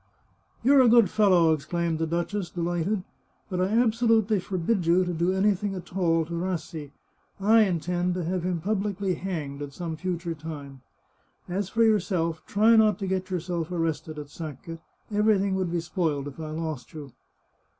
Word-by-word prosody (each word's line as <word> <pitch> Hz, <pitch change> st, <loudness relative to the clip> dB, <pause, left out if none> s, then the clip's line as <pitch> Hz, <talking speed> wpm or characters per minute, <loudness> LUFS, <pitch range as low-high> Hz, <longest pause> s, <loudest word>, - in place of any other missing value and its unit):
" -, -, -37 dB
You're 275 Hz, +2 st, +6 dB
a 245 Hz, -, +6 dB
good 230 Hz, -4 st, +5 dB
fellow," 185 Hz, -6 st, +4 dB
exclaimed 165 Hz, +2 st, -2 dB
the 165 Hz, -, 0 dB
duchess, 175 Hz, +3 st, -2 dB
de 175 Hz, -, -8 dB
lighted. 175 Hz, +4 st, -1 dB, 0.2 s
" -, -, -41 dB
But 180 Hz, -1 st, -1 dB
I -, -, +3 dB
absolutely 225 Hz, -1 st, +2 dB
forbid 185 Hz, 0 st, -1 dB
you 180 Hz, +2 st, +4 dB
to 180 Hz, -, -2 dB
do 170 Hz, +2 st, +1 dB
anything 195 Hz, +1 st, +1 dB
at 180 Hz, 0 st, -9 dB
all 165 Hz, -3 st, +2 dB
to 170 Hz, -, -8 dB
Rassi. 170 Hz, -3 st, -4 dB, 0.5 s
I 220 Hz, +3 st, +5 dB
intend 180 Hz, 0 st, -1 dB
to 180 Hz, -, -2 dB
have 180 Hz, +2 st, -1 dB
him 175 Hz, -1 st, -2 dB
publicly 200 Hz, 0 st, -1 dB
hanged 160 Hz, -6 st, -4 dB
at 145 Hz, -1 st, -6 dB
some 165 Hz, +1 st, -4 dB
future 175 Hz, 0 st, -3 dB
time. 145 Hz, -4 st, -8 dB, 0.7 s
As 190 Hz, +2 st, -2 dB
for 230 Hz, +3 st, +2 dB
yourself, 180 Hz, -7 st, +1 dB
try 220 Hz, +3 st, +4 dB
not 215 Hz, -3 st, +4 dB
to 200 Hz, -, -4 dB
get 185 Hz, 0 st, -2 dB
your 185 Hz, -1 st, -1 dB
self 170 Hz, 0 st, -4 dB
arrested 165 Hz, -2 st, -2 dB
at 145 Hz, -1 st, -8 dB
Sacca; 165 Hz, +1 st, -7 dB, 0.3 s
everything 205 Hz, -2 st, +2 dB
would 185 Hz, -2 st, -1 dB
be 175 Hz, -, 0 dB
spoiled 160 Hz, -5 st, -2 dB
if 145 Hz, +2 st, -9 dB
I 155 Hz, -1 st, -5 dB
lost 155 Hz, -3 st, -5 dB
you." 145 Hz, -4 st, -8 dB
180 Hz, 180 wpm, -26 LUFS, 165-200 Hz, 0.7 s, You're